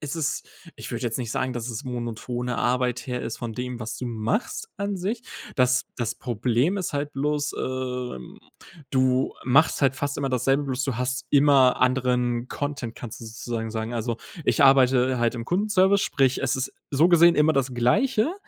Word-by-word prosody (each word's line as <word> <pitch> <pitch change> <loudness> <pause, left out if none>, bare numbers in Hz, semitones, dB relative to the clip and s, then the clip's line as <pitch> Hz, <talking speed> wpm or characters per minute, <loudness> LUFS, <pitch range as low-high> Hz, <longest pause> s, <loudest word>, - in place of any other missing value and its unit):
es 150 +2 -5
ist 145 -5 -2 0.3
ich - - -8
würde - - -4
jetzt 115 -1 -1
nicht 120 -3 -4
sagen, 130 +1 -1
dass 120 0 -4
es 110 - -6
monotone 120 0 -4
Arbeit 125 0 0
her 125 -1 -3
ist 115 - -5
von 120 -2 -5
dem, 125 0 -4
was 110 0 -5
du - - -6
machst 115 - -2
an 200 0 -2
sich. 215 +7 -3 0.3
Das 125 0 +3
das 120 -1 -2
Problem 125 - 0
ist 185 -4 -3
halt 145 +1 -2
bloß, 145 +1 -1
ähm, 125 - -4 0.5
du 130 0 +2
machst 140 +5 +3
halt 135 -2 +2
fast 145 0 -2
immer 140 -1 -1
dasselbe, 135 +3 +1
bloß 130 -1 -2
du 135 -5 -2
hast 130 +1 -2
immer 140 -3 +5
anderen 125 -1 +1
Content, 140 -5 -4
kannst 120 -4 -8
du - - -8
sozusagen 115 0 -5
sagen. 110 +1 -4
Also 115 0 -2 0.3
ich - - +3
arbeite 130 -1 +5
halt 120 0 +1
im 115 -1 -5
Kundenservice, 195 +1 +3
sprich, 135 -3 +1
es 130 -1 +1
ist 130 - -3 0.2
so 150 +5 +4
gesehen 170 -1 +6
immer 155 +1 +4
das 135 -1 0
Gleiche, 215 - +2
130 Hz, 185 wpm, -25 LUFS, 120-145 Hz, 0.5 s, gesehen